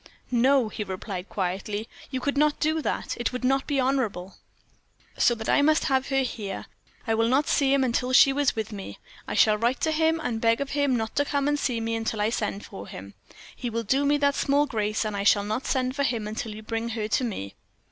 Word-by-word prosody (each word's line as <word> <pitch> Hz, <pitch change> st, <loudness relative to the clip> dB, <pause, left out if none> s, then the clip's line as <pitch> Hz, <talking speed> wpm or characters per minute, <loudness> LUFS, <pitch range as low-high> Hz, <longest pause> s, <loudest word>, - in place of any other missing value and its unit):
"No," 255 Hz, 0 st, +4 dB
he 215 Hz, -, -4 dB
replied, 190 Hz, -1 st, -6 dB
quietly, 200 Hz, +3 st, -3 dB, 0.2 s
"you 260 Hz, -, -3 dB
could 280 Hz, +2 st, -1 dB
not 295 Hz, +1 st, +2 dB
do 315 Hz, +1 st, +1 dB
that; -, -, -2 dB
it 240 Hz, -, 0 dB
would 250 Hz, 0 st, -5 dB
not 270 Hz, +1 st, +1 dB
be 285 Hz, -2 st, 0 dB
honorable." 230 Hz, -9 st, -1 dB, 0.8 s
"So 240 Hz, -, +3 dB
that 220 Hz, -1 st, -6 dB
I -, -, +4 dB
must 310 Hz, +2 st, +3 dB
have 265 Hz, -2 st, +1 dB
her 270 Hz, -1 st, +2 dB
here. 205 Hz, -6 st, -5 dB, 0.4 s
I 225 Hz, -, +1 dB
will 225 Hz, +1 st, +2 dB
not 270 Hz, +5 st, +2 dB
see 275 Hz, -2 st, +2 dB
him 275 Hz, -1 st, +3 dB
until 250 Hz, 0 st, 0 dB
she 270 Hz, +1 st, +7 dB
is 285 Hz, 0 st, +1 dB
with 220 Hz, -1 st, -3 dB
me. 200 Hz, -2 st, -7 dB, 0.3 s
I -, -, -3 dB
shall 210 Hz, -1 st, +4 dB
write 240 Hz, +3 st, +1 dB
to 320 Hz, -, +1 dB
him, 320 Hz, +1 st, +2 dB
and 230 Hz, -7 st, -3 dB
beg 230 Hz, 0 st, +3 dB
of 280 Hz, -1 st, -3 dB
him 285 Hz, -2 st, +1 dB
not 220 Hz, -2 st, -3 dB
to 285 Hz, -, +3 dB
come 285 Hz, -1 st, 0 dB
and 290 Hz, 0 st, +1 dB
see 245 Hz, -5 st, -1 dB
me 225 Hz, 0 st, -2 dB
until 225 Hz, -1 st, -2 dB
I 210 Hz, +2 st, +1 dB
send 210 Hz, -3 st, -3 dB
for 100 Hz, -, -9 dB
him. 100 Hz, +2 st, -9 dB, 0.4 s
He 245 Hz, -, -4 dB
will 230 Hz, 0 st, -2 dB
do 265 Hz, +6 st, +1 dB
me 290 Hz, +1 st, +3 dB
that 285 Hz, -1 st, +2 dB
small 285 Hz, +1 st, +2 dB
grace, 215 Hz, -4 st, -1 dB
and 210 Hz, -1 st, -3 dB
I 200 Hz, -, -2 dB
shall 200 Hz, 0 st, +4 dB
not 215 Hz, +5 st, -3 dB
send 255 Hz, -1 st, 0 dB
for 285 Hz, -, -1 dB
him 235 Hz, -6 st, 0 dB
until 220 Hz, 0 st, -5 dB
you 215 Hz, -, -9 dB
bring 225 Hz, +1 st, -3 dB
her 220 Hz, -2 st, -3 dB
to 230 Hz, -, +1 dB
me." 100 Hz, -, -4 dB
240 Hz, 240 wpm, -26 LUFS, 215-275 Hz, 0.8 s, she